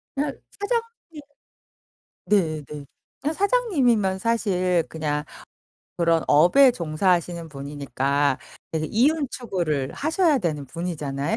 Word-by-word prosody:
그냥 280 0 -1 0.2
사장님 460 -7 -4 1.1
네네. 155 -7 0 0.4
그냥 300 +3 -1
사장님이면 280 - +2
사실 185 -6 +1
그냥 150 -2 -2 0.7
그런 165 -2 +2
업에 180 - +6
종사하시는 170 -2 0
분이니까 140 -1 -1 0.3
이제 155 -1 -1
이윤 280 +6 +2
추구를 165 - -2
하셔야 320 0 +2
되는 155 - -2
분이잖아요. 150 +1 -3
180 Hz, 255 characters per minute, -24 LUFS, -, 1.1 s, 업에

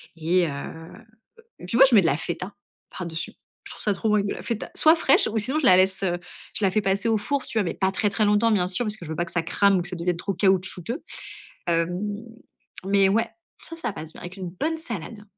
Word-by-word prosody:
et 170 +2 +1
heu - - -3
heu, 165 +10 -9 0.5
puis 205 - -2
moi, 265 - +10
mets 210 -4 +7
de - - +2
la 150 - +1
feta 180 +4 -4 0.4
par 180 - -4
dessus. 165 -1 -5 0.3
Je - - -11
trouve - - -11
ça 210 - +1
trop 215 +2 0
bien, 205 -1 +2
de 200 - -2
la - - -8
feta 230 -3 -4
soit 315 +1 +6
fraîche 280 -4 +4
ou 220 - -1
sinon 260 +8 +2
je 310 - -2
la 185 - +8
laisse, 190 +1 +2
heu, 175 -2 0 0.4
je - - -2
la 190 - +4
fais 215 +3 +1
passer 195 +3 +1
au 225 - +3
four, 275 +6 -2
tu 260 - -7
vois? 210 - +2
Mais 170 - -2
pas 190 0 0
très 205 +2 0
très 210 +1 +1
longtemps, 210 +2 +3
bien 185 -5 +2
sûr, 185 +6 0
parce 210 -1 -2
que 175 - -9
je - - -7
veux 160 - -4
pas 175 - 0
que 170 - -10
ça 175 - 0
crame 195 +3 +3
ou - - -1
que 175 - -5
ça 180 - -4
devienne 170 +1 -1
trop 195 +3 -3
caoutchouteux. 190 - 0 0.6
Hem, 170 +1 0 0.9
mais 195 0 +4
ouais, 225 +4 +1 0.3
ça, 330 - -7
ça 325 -9 -3
passe 160 -3 -8
bien - - -12
avec 175 +2 -8
une 185 -2 -5
bonne 310 - -2
salade. 220 - -6
195 Hz, 260 wpm, -24 LUFS, 175-220 Hz, 0.9 s, moi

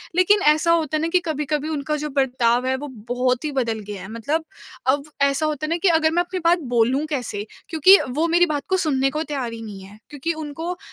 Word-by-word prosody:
लेकिन 400 +3 +4
ऐसा 315 +2 +1
होता 315 -2 +1
है - - -2
ना 325 - 0
कि - - +3
कभी-कभी 300 -1 -2
उनका 300 0 -2
जो - - -3
बर्ताव 255 -3 +1
है 260 - +1
वो 290 +2 -6
बहुत 250 +2 -2
ही 300 - -2
बदल 235 -5 -1
गया 200 -2 -7
है, - - -8
मतलब 290 +9 -2 0.4
अब 280 +2 +2 0.2
ऐसा 280 +2 +2
होता 305 -1 -2
है - - -4
ना 335 - +1
कि 395 - +3
अगर 320 -1 +3
मैं 345 +2 +2
अपनी 365 +1 -5
बात 345 +1 +4
बोलूँ 245 +5 +2
कैसे? 245 -8 -3 0.2
क्योंकि 355 +5 +7
वो 305 +6 0
मेरी 345 +1 +4
बात 300 -4 -2
को 375 - +2
सुनने 275 -7 +1
को 305 - -2
तैयार 270 -6 -4
ही 230 - -8
नहीं 205 -3 -8
है। 200 +2 -14
क्योंकि 295 +3 -3
उनको 320 +4 -5
295 Hz, 235 wpm, -22 LUFS, 255-320 Hz, 0.4 s, क्योंकि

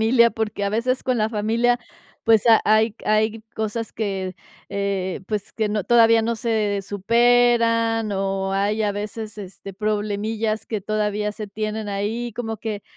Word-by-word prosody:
familia, 235 +1 +5
porque, 215 -2 -3
a 200 - 0
veces, 250 +4 0
con 255 -2 0
la 215 - +2
familia, 230 +3 +1 0.5
pues, 225 0 +4
ha 225 -1 +7
hay 215 0 +3
hay 215 +1 +1
cosas 220 +1 -3
que, 190 -4 -3 0.4
eh, 195 -2 -2
pues, 210 -2 -4
que 215 -2 -1
no 210 -2 -1
todavía 230 -1 +5
no 230 +1 0
se 215 -4 0
superan, 230 +1 +3
o 195 0 -1
hay, 205 +3 +1
a 205 -1 +1
veces, 210 +1 -6
este, 195 -1 -9
problemillas 215 +1 -1
que 215 -3 -3
todavía 210 0 -1
se 215 -1 -6
tienen 215 +1 -4
ahí, 220 +4 -2
como 225 -2 -4
que 215 -1 -5
215 Hz, 155 wpm, -22 LUFS, 205-225 Hz, 0.5 s, ha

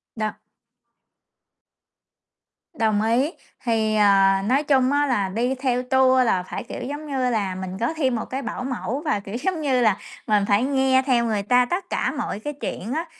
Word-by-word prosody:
Đồng 215 -1 -2 2.4
Đồng 215 -6 +1
ý. 245 +8 +1 0.3
Thì, 220 -2 +1
ờ, 195 -2 +5
nói 270 +6 +2
chung 270 -2 +3
á 290 0 +2
là 205 -7 0
đi 245 +6 -1
theo 250 -1 -1
tour 260 0 +4
là 185 -5 +1
phải, - - -6
kiểu, - - -7
giống 290 +4 -5
như 260 -3 0
là, 200 -5 -1
mình 185 0 -6
có 235 +7 0
thêm 260 -5 +1
một 225 - -3
cái 265 +2 -4
bảo 250 +1 -5
mẫu 260 +1 -3
và 210 -8 +1
kiểu, 200 +2 -8
giống 370 -4 -1
như 265 -4 +1
là, 210 -4 +3 0.3
mình 210 -2 +3
phải 205 +3 +3
nghe 265 -1 +3
theo 240 -3 +2
người 215 -3 -1
ta 250 +3 +4
tất 360 +5 -3
cả - - 0
mọi - - -4
cái 295 +7 -5
chuyện 245 -4 -5
á, 325 +2 -2
245 Hz, 190 wpm, -23 LUFS, 215-265 Hz, 2.4 s, ờ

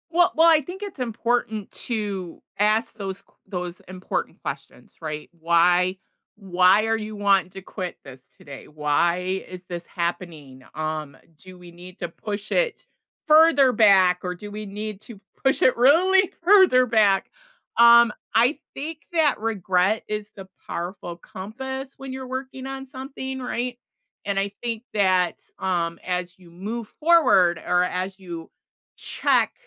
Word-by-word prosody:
Well 350 +2 +3
well, 325 +1 +6
I 315 -2 +5
think 360 +7 -9
it's 395 -8 -8
important 230 -3 -2
to 200 -7 -5 0.2
ask 215 +3 +1
those 195 -1 -5
qu - - -33
those 180 -2 -5
important 185 0 -4
questions, - - -8
right. 155 -1 -6
"Why 175 +3 +3 0.4
why 190 +1 +3
are 225 0 +1
you 215 0 -6
wanting 195 -3 +2
to 195 - -9
quit 185 -1 -6
this 130 -1 -12 0.2
today? 140 -2 -11
Why 170 +5 0
is 185 0 -10
this 175 -1 -5
happening? 165 -7 -5
Um, 155 -2 -4 0.2
do 185 +2 -14
we 175 -1 -13
need 180 +2 -13
to 175 - -4
push 205 +4 -6
it - - 0 0.4
further 305 -4 +6
back, 190 -6 +5
or 180 -1 -2
do 205 +3 -9
we 210 +1 -6
need 210 0 -6
to 220 -4 -11 0.3
push 270 - +3
it 255 - +4
really 365 +9 +4
further 360 -9 +6
back?" 210 -5 +3 0.5
Um, 235 -1 +8 0.2
I 245 +6 +3 0.2
think 305 +3 -6
that 315 -3 +2
regret 200 -2 0
is 210 0 -4
the 195 -1 -10 0.2
powerful 175 0 -5
compass 265 +10 -7
when 270 -1 -8
you're 260 0 -6
working 260 0 -6
on 270 0 -6
something, 265 0 -7
right, 250 -1 -3 0.5
and 200 0 -2
I 200 0 -1
think 230 -1 -3
that, 185 -3 +2 0.2
um, 170 -3 -1
as 180 0 -3
you 175 -2 -17
move 210 +6 -6
forward 255 - +4
or 180 0 +3
as 185 +2 -3
you 170 -3 -8 0.5
check, - - +1
200 Hz, 150 wpm, -24 LUFS, 180-250 Hz, 0.5 s, Um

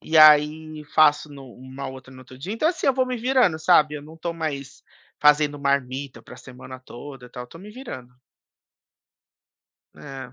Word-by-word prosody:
e 160 - -1
aí 155 0 +5
faço 150 -1 +4
no 140 -1 -11
uma 130 +2 -8
outra 130 0 -11
no 130 - -13
outro 130 0 -14
dia. 175 +10 -5
Então, 230 +8 +1
assim, 340 -1 -2
eu 270 - +4
vou 260 0 +2
me 255 0 -3
virando, 245 -8 +2
sabe, 155 -2 +3
eu 145 - -8
não 155 +2 -13
tô 170 +1 -4
mais 145 -5 -5 0.4
fazendo 150 0 +3
marmita 140 -1 -2
pra - - -13
semana 130 0 -11
toda 130 0 -11
e - - -16
tal. 125 0 -8
Tô 165 - -14
me 200 +4 -11
virando. 130 - -9 1.8
É. 135 -3 -10
150 Hz, 180 wpm, -23 LUFS, 130-160 Hz, 1.8 s, aí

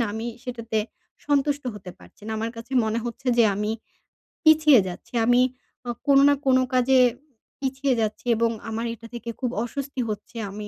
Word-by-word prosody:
না 235 - +2
আমি 225 +1 -4 0.2
সেটাতে 230 -4 -3 0.5
সন্তুষ্ট 290 0 +1
হতে 190 -3 -9
পারছি - - -19
না। 220 - -3
আমার 225 +1 -2
কাছে 230 +3 -9
মনে 220 +1 0
হচ্ছে 240 +2 -7
যে 235 - +7
আমি 210 +2 -1 0.7
পিছিয়ে 310 -4 +7
যাচ্ছি, 175 - -9
আমি 245 +1 +5 0.5
আ - - -2 0.2
কোনো 275 -1 +6
না - - +5
কোনো 260 -1 +4
কাজে 255 +1 +4 0.6
পিছিয়ে 270 0 0
যাচ্ছি 215 +2 -3
এবং 230 +1 +2 0.2
আমার 225 +1 -3
এটা 230 0 -11
থেকে 235 0 -6
খুব 250 - -1
অস্বস্তি 275 +2 -4
হচ্ছে, 230 +3 -6
আমি 210 +2 -7
240 Hz, 175 wpm, -24 LUFS, 220-270 Hz, 0.7 s, যে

